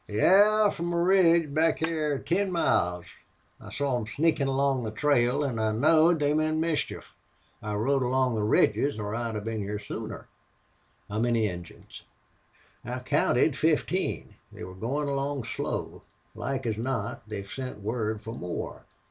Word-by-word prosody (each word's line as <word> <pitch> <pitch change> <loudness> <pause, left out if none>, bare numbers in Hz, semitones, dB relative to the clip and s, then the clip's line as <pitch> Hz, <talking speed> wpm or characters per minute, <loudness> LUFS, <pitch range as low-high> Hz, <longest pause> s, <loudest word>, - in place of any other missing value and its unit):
"Yes, 205 - +4
from 170 +1 -3
a - - 0
ridge 170 -4 +4
back 160 +1 +2
hyar 155 -3 -1
ten 190 +6 0
miles. 90 - +1 0.5
I - - -11
saw 140 -2 -1
them 120 -3 -2
sneakin' 145 +3 +1
along 135 -1 +1
the 110 - -3
trail 125 +3 +2
an' 120 -5 -2
I 110 -1 +1
knowed 160 +8 +4
they 145 0 +2
meant 155 +1 +1
mischief. 160 -1 -2 0.5
I 105 0 -3
rode 135 +6 +1
along 130 0 +1
the 110 - -1
ridges 110 +5 +2
or 105 -1 -4
I'd 115 -3 -3
been 110 -1 -3
hyar 105 +1 -3
sooner." 105 - -7 0.8
"How 105 +1 -3
many 115 -2 +2
Injuns?" 90 -3 -9 0.8
"I 125 +2 -4
counted 130 +2 +2
fifteen. 160 +5 0 0.2
They - - -10
were 90 - -8
goin' 130 +10 -2
along 140 -1 -2
slow. 115 - -4 0.3
Like 135 -2 -4
as 110 -2 -2
not 115 -4 -3
they've 100 -2 -5
sent 130 -1 -6
word 110 0 -2
fer 110 - -6
more. 90 -6 -6
130 Hz, 155 wpm, -27 LUFS, 110-155 Hz, 0.8 s, Yes